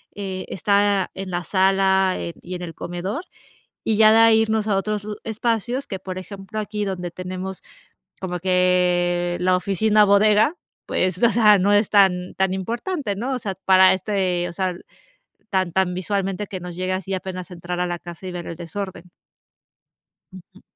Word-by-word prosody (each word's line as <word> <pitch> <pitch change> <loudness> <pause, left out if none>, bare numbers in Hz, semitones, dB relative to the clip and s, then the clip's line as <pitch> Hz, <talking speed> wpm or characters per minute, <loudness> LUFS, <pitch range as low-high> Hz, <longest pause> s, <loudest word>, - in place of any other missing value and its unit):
eh, 190 -2 -5
está 200 -1 +1
en 195 0 -6
la 175 0 -2
sala, 190 -1 +3
eh, 170 - -5
y 180 +1 -7
en 180 - -6
el 165 -2 -6
comedor, 185 - -4 0.6
y 215 -2 +1
ya 215 0 +7
de 225 - +6
ahí 225 -1 +6
irnos 220 -1 0
a 205 - +2
otros 210 +1 -2
lu 210 -1 -5
espacios 230 +3 -1
que, 190 - -5
por 185 0 -6
ejemplo, 195 +2 -7
aquí 210 0 -3
donde 180 -3 -4
tenemos, 185 +1 -6 0.6
como 180 -2 -4
que 180 -1 +2
la 185 +1 +3
oficina 210 +3 +3
bodega, 210 - +4 0.3
pues, 185 +3 -1
o 235 - +6
sea, 210 -3 +5
no 200 +3 +2
es 205 0 +3
tan 185 -3 +3
tan 190 -1 +1
importante, 235 - -3
¿no? 245 +6 -3
O - - -2
sea, 200 -4 -4
para 190 0 +7
este, 185 -2 -1
o - - -7
sea, 185 0 -1 0.8
tan, 185 -3 0
tan 185 -1 +1
visualmente 195 +2 -2
que 185 -2 -6
nos 175 -1 -8
llega 185 +1 -1
así 195 0 -4
apenas 185 -1 -6
entrar 175 0 -5
a 180 - +1
la 175 0 -3
casa 175 +1 -10
y 185 - -5
ver 175 -1 -6
el 165 - -6
desorden. 180 +1 -7 1.2
Ujú. 185 +1 -15
190 Hz, 180 wpm, -22 LUFS, 180-205 Hz, 1.2 s, ya